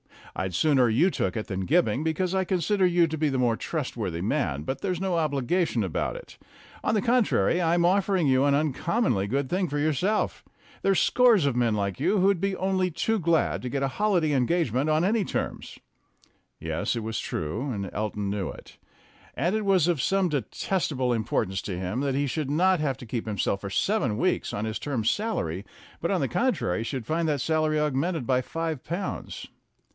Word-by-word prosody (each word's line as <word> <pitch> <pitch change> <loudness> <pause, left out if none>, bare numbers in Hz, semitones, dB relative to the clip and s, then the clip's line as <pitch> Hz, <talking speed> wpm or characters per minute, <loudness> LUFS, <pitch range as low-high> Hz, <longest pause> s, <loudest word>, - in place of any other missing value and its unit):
I'd 95 -2 -3
sooner 135 - +3
you 150 - +3
took 95 - -1
it 110 - -3
than 95 -1 -3
Gibbing, 155 -2 +2
because 165 +3 -1
I 190 0 +2
consider 190 +1 +1
you 175 -1 +4
to 160 -1 -4
be 155 0 +1
the 135 - -1
more 120 -3 +2
trustworthy 115 - -3
man, 90 - -1
but 130 - -4
there's 185 -4 -1
no 190 -2 0
obligation 150 - 0
about 90 -5 -2
it. - - -11 0.5
On - - +1
the 210 - +2
contrary, 215 - +2
I 165 -1 +2
am 175 - +2
offering 190 -2 +2
you 130 +1 +3
an 140 -1 +3
uncommonly 150 - 0
good 135 +4 -1
thing 185 +2 0
for 145 - -3
yourself. 155 +8 0 0.4
There's 195 -1 +3
scores 240 - +4
of 140 -3 +1
men 115 -3 +2
like 100 -2 -2
you 210 - +2
who'd 195 -1 +3
be 195 -1 0
only 185 -1 0
too 215 +7 0
glad 165 -2 +1
to 125 - -4
get 140 +1 -2
a 135 - +1
holiday 180 -3 +1
engagement 135 0 +1
on 155 +2 +2
any 210 +3 +2
terms." - - -4 0.8
Yes, - - -2
that 115 - -3
was 110 0 -3
true, 100 - -3
and 100 -6 -3
Elton 105 -1 -2
knew 100 -2 -2
it. - - -12 0.6
And 175 - 0
it 215 -1 -1
was 190 -4 +3
of 170 -6 +1
some 195 +2 +2
detestable 140 - -1
importance 105 -4 -1
to 95 -3 -4
him 95 +6 -3
that 135 -1 0
he 140 +1 +1
should 140 +1 -2
not 180 +4 +3
have 140 -4 -1
to 125 - -9
keep 115 0 -4
himself 100 -2 -1
for 100 - -5
seven 125 - 0
weeks 185 +9 0
on 105 - -2
his 110 0 -3
term's 125 -7 0
salary, 100 - -2 0.4
but, - - -2
on - - +1
the - - 0
contrary, 90 +5 0
should 125 -1 -4
find 165 +4 0
that 145 -4 0
salary 155 0 +1
augmented 150 +1 0
by 130 0 +2
five 160 +1 -4
pounds. 175 +4 -5
145 Hz, 200 wpm, -26 LUFS, 115-180 Hz, 0.8 s, you